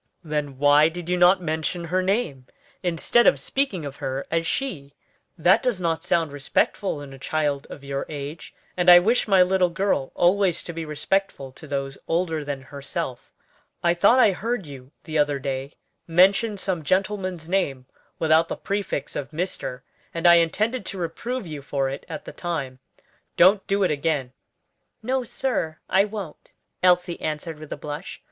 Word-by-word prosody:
"Then 150 -4 -3
why 145 +2 +5
did 175 +1 -7
you 180 - +2
not 180 +1 +5
mention 160 +2 -2
her 185 +3 0
name, 185 - -1 0.3
instead 180 +7 +3
of - - +5
speaking 240 - -1
of 140 -1 -7
her 135 +1 -3
as 165 0 0
she? 145 - -3 0.4
That 175 +3 +4
does 245 -7 0
not 165 -2 -1
sound 165 -3 +1
respectful 145 +4 -1
in 135 -1 -10
a 135 - -12
child 145 -1 -1
of 140 - -10
your 140 0 -4
age, 145 +1 -7 0.2
and 180 0 +3
I 175 - +11
wish 220 +8 +3
my 190 -3 +6
little 185 0 +2
girl 170 -6 -1
always 180 -1 +2
to 170 - -6
be 165 0 -5
respectful 150 -2 -2
to 155 - -13
those 135 -1 -4
older 165 -2 0
than 140 -2 -5
herself. 140 -1 -6 0.5
I 170 0 +4
thought 205 +8 +4
I 235 -5 +6
heard 220 +2 -3
you 135 -2 -11
the 155 -1 -2
other 145 -1 +2
day 135 +1 -4 0.3
mention 195 +6 +4
some 185 -3 -2
gentleman's 185 0 -1
name 150 -9 -1 0.3
without 160 +1 +3
the - - -4
prefix 200 -8 -3
of 135 - -4
Mr., 150 -6 -3 0.3
and 165 +1 -3
I 175 - +9
intended 215 +8 +1
to 195 - -5
reprove 205 +8 -4
you 155 -4 -7
for 135 -1 -1
it 140 - -8
at 155 - -6
the - - -8
time. 140 -7 -4 0.6
Don't 195 +3 +5
do 200 0 +1
it 185 - +2
again." 145 -4 -1 0.7
"No, 260 +2 0
sir, 225 -10 -2
I 195 +1 +4
won't," 205 -7 -8 0.3
Elsie 180 -1 +3
answered 155 0 -4
with 155 -1 -11
a - - -4
blush. 150 +4 -7
165 Hz, 175 wpm, -24 LUFS, 145-190 Hz, 0.7 s, I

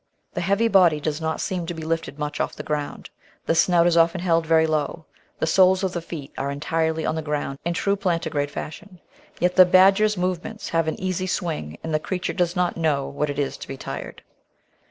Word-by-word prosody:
The - - -2
heavy 200 +6 +2
body 180 -8 +5
does 150 +1 -3
not 160 0 -2
seem 180 -3 -3
to 175 - -4
be 160 - -6
lifted 160 -3 -3
much 150 -1 -4
off - - -1
the - - -7
ground, 150 -1 -4 0.3
the - - +2
snout 170 +1 +4
is 175 -1 +3
often 170 +2 +3
held 165 -2 +1
very 160 0 +4
low, 155 +1 -2 0.3
the - - 0
soles 185 +3 +4
of 185 -2 -1
the 175 - -3
feet 160 -4 -8
are 140 - -1
entirely 160 +2 -1
on - - 0
the 160 - -2
ground 150 -2 -3
in 170 0 -1
true 200 +2 +1
plantigrade 165 -7 -1
fashion. 180 +6 -8 0.4
Yet 180 +1 +1
the 185 - +11
badger's 195 +3 +5
move 180 -1 -1
ments 220 -1 -7
have 165 -1 +1
an 160 - -2
easy 185 0 -2
swing, 155 - -3
and 160 - -4
the 155 - +2
creature 180 +3 -3
does 175 -1 0
not 180 -1 0
know 150 -4 0
what 150 +1 -2
it 145 - -4
is 145 -2 -2
to - - -9
be 135 - -6
tired. - - -7
165 Hz, 220 wpm, -23 LUFS, 155-180 Hz, 0.4 s, the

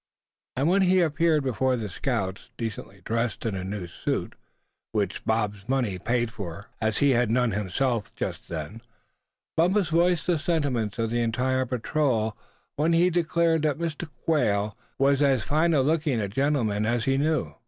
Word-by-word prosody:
And 135 +4 +1
when 190 +3 +4
he 185 0 +4
appeared 160 -2 +2
before 130 0 +1
the 110 -3 -3
scouts, 100 -1 -3
decently 105 -4 -6
dressed 115 0 -1
in 110 - 0
a 95 -1 -3
new 95 -1 -4
suit, 85 - -3 0.6
which - - -1
Bob's 105 -1 -1
money 120 -9 0
paid 120 +2 0
for, 100 0 -8
as 110 -1 0
he 140 -1 +4
had 120 -2 +2
none 125 0 +2
himself 105 +3 -1
just - - -4
then, 85 +7 -6 0.7
Bumpus 180 +2 +2
voiced 170 0 +2
the 170 -3 +1
sentiments 140 - -1
of 115 -1 -1
the 120 0 +1
entire 130 +3 0
patrol 120 -3 0 0.4
when 160 +3 +2
he 175 +2 +4
declared 170 -1 +2
that 150 -2 +1
Mr. 165 0 -4 0.2
Quail 105 -10 +1 0.2
was 140 +1 +3
as 135 -5 +3
fine 155 +3 +2
looking 150 -2 +2
a 105 - -1
gentleman 110 -3 0
as 120 -1 0
he 135 0 +2
knew. 155 +2 0
125 Hz, 165 wpm, -26 LUFS, 110-155 Hz, 0.7 s, when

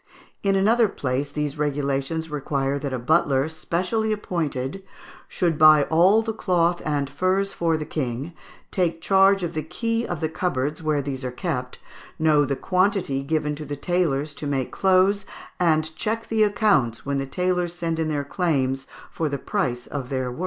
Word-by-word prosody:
In 195 -1 +2
another 220 +4 +4
place 140 -4 -2
these 150 0 -3
regulations 145 +2 -1
require 140 -1 -1
that 140 -1 -4
a 130 - -1
butler, 135 +2 +2
specially 180 +7 -1
appointed, 165 -6 -2 0.5
"should 170 -4 -1
buy 155 -1 +8
all 190 +7 +5
the 225 0 -3
cloth 175 -4 +1
and 145 -2 -1
furs 190 +5 0
for 165 -2 +1
the 155 - -4
king, 140 +1 -3 0.4
take 170 -3 0
charge 195 +1 +4
of 170 -1 -3
the 155 - -2
key 230 +9 -2
of 175 - -3
the 160 - 0
cupboards 155 -3 -2
where 155 -3 0
these 135 -1 -4
are 130 - -2
kept, 125 -3 -4 0.4
know 155 -2 +4
the 140 0 -1
quantity 185 -5 +1
given 150 +1 -1
to 150 +1 -6
the 145 0 -5
tailors 155 -3 0
to 145 - -6
make 135 -3 -1
clothes, 190 +1 +3 0.4
and 160 -2 +2
check 225 +5 -3
the 220 -1 +1
accounts 200 - +2
when 140 0 -1
the 135 - -3
tailors 180 +2 -1
send 165 -2 -2
in 160 -1 0
their 145 -2 -1
claims 135 -5 0 0.2
for 160 -2 -2
the 140 - -2
price 125 - -2
of 135 -4 -5
their 130 -2 -2
work." 125 - -9
155 Hz, 175 wpm, -24 LUFS, 140-185 Hz, 0.5 s, buy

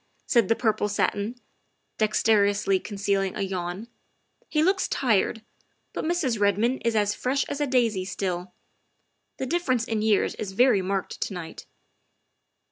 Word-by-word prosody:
said 235 -6 +3
the 225 - +3
purple 215 -3 0
satin, 205 +2 -1 0.6
dex 215 -1 +1
terously 200 -3 +3
concealing 195 -2 -1
a - - -2
yawn; 185 +2 -4 0.6
"he 305 0 +2
looks 385 +3 +2
tired, 225 -3 +1 0.5
but - - -3
Mrs. 315 -9 0
Redmond 205 +5 +2
is 230 -1 +1
as 205 -1 +2
fresh 265 +5 0
as 285 - -4
a 290 - +1
daisy 230 -7 +1
still. 185 -1 -3 0.9
The - - -3
difference 260 -6 0
in 220 -2 -1
years 215 -2 +2
is 195 -3 -6
very 245 -2 +4
marked 190 0 -3
to - - -2
night." 165 -2 -8
215 Hz, 145 wpm, -26 LUFS, 195-245 Hz, 0.9 s, very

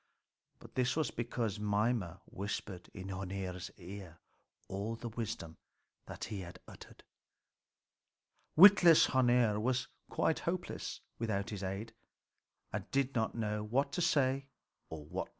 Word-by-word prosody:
But - - -15
this 125 0 +1
was 155 -2 0
because 115 -3 -2
Mimer 105 -3 0
whispered 100 -2 -5
in 95 0 -7
Hœnir's 95 -1 -4
ear 90 -2 -9 0.5
all 100 +4 -3
the 120 +1 -6
wisdom 105 -8 -5 0.5
that - - -7
he 100 -3 -4
uttered. 85 0 -12 1.5
Witless 175 -2 +9
Hœnir 120 -5 +3
was 125 +4 0 0.2
quite 160 - +1
helpless 180 +1 -3 0.2
without 105 -3 -1
his 100 -2 -4
aid, 100 +4 -4 0.8
and 105 0 -4
did 140 0 +1
not 110 -2 0
know 105 -2 -1
what 135 +6 +1
to 180 - -1
do 135 -5 +3 0.5
or 75 -2 -5
say. - - -28
110 Hz, 125 wpm, -34 LUFS, 95-130 Hz, 1.5 s, Witless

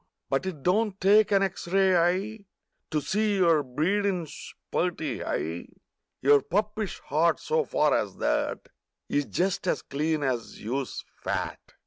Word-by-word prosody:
But 135 +7 0
it 155 -7 -6
don't 200 +2 +1
take 210 +2 +5
an 195 -1 +4
X 190 -2 -3
ray 190 +1 +3
eye 190 +5 +1 0.4
To 150 - 0
see 210 +5 +1
your 170 -5 +4
breedin's 170 +4 -2 0.2
purty 165 -6 -1
high— 80 +2 -3 0.6
lour 140 +1 +6
puppish 210 +3 -2
heart, 160 +3 +2
so 470 0 +1
far - - +2
as - - -2
that, - - -1 0.4
Is 145 0 0
just 185 +5 -1
as - - 0
clean 150 +2 -1
as 125 -4 -2
if - - -13
you's 130 +4 -3 0.2
fat. - - -2
175 Hz, 145 wpm, -27 LUFS, 145-200 Hz, 0.6 s, lour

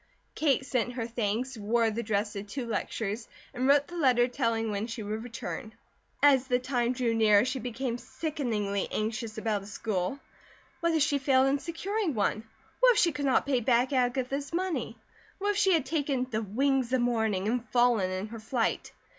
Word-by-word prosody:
Kate 275 -3 +1
sent 245 -2 -1
her 235 -2 -3
thanks, 235 +2 -2
wore 225 +1 +1
the 225 +2 -2
dress 210 -1 -1
to 200 - -4
two 210 +6 -5
lectures, 220 -1 -3 0.3
and 255 +1 -1
wrote 285 +1 +5
the 350 - -10
letter 255 -7 +4
telling 225 -2 -1
when 205 +2 -2
she 230 -2 -5
would 215 +2 -4
return. 230 -1 -6 0.5
As 270 -3 +5
the 250 - +3
time 250 -1 0
drew 245 -2 0
nearer 215 -1 +5
she 260 +1 -2
became 245 +1 -3
sickeningly 225 -13 -2
anxious 220 +1 -3
about 220 -2 -1
a 195 - -11
school. 205 +2 -2 0.6
What 335 -1 +1
if 310 - +4
she 285 -1 +1
failed 265 -1 +4
in 280 +1 +1
securing 355 - -2
one? 215 +1 0 0.3
What - - +6
if - - -3
she 340 - +4
could 290 -1 -3
not 265 - +3
pay 270 -3 +2
back 245 +3 +2
Agatha's 260 +2 0
money? 330 -10 -2 0.4
What 410 +1 0
if 410 - -3
she 390 -2 +4
had 315 -5 +2
taken 280 -3 0
"the 220 0 0
wings 255 +4 0
of 260 - +3
morning," 220 -5 0
and 240 +1 -1
fallen 240 -6 +3
in 185 +3 -4
her 230 0 -7
flight? 225 +1 -1
245 Hz, 190 wpm, -29 LUFS, 220-275 Hz, 0.6 s, What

